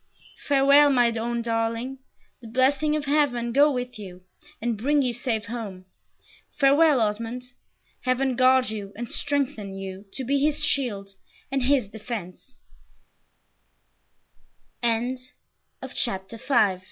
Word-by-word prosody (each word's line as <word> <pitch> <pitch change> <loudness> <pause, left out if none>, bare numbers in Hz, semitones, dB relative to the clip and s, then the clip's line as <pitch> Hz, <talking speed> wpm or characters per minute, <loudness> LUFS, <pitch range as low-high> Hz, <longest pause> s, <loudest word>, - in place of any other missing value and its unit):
"Farewell, 280 +1 +6
my 245 -3 +3
own 235 +1 -2
darling. 230 +3 -2 0.4
The 235 - -10
blessing 270 +6 +2
of 300 -1 -2
Heaven 270 -5 +1
go 290 +3 +5
with 250 -3 -4
you, 185 -3 -10 0.4
and 235 +1 -1
bring 280 +7 +1
you 250 -2 0
safe 230 -2 -2
home! 205 -5 -7 0.7
Farewell, 285 +1 +5
Osmond. 225 +3 -2 0.6
Heaven 255 0 +1
guard 255 -1 +4
you 205 -2 -6
and 235 +1 -6
strengthen 270 -9 -1
you 195 +1 -7
to 265 - -4
be 280 +3 +1
his 300 +1 +3
shield 210 -8 0 0.4
and 270 0 0
his 255 -3 +2
d 220 - -10
250 Hz, 110 wpm, -25 LUFS, 225-275 Hz, 0.7 s, Farewell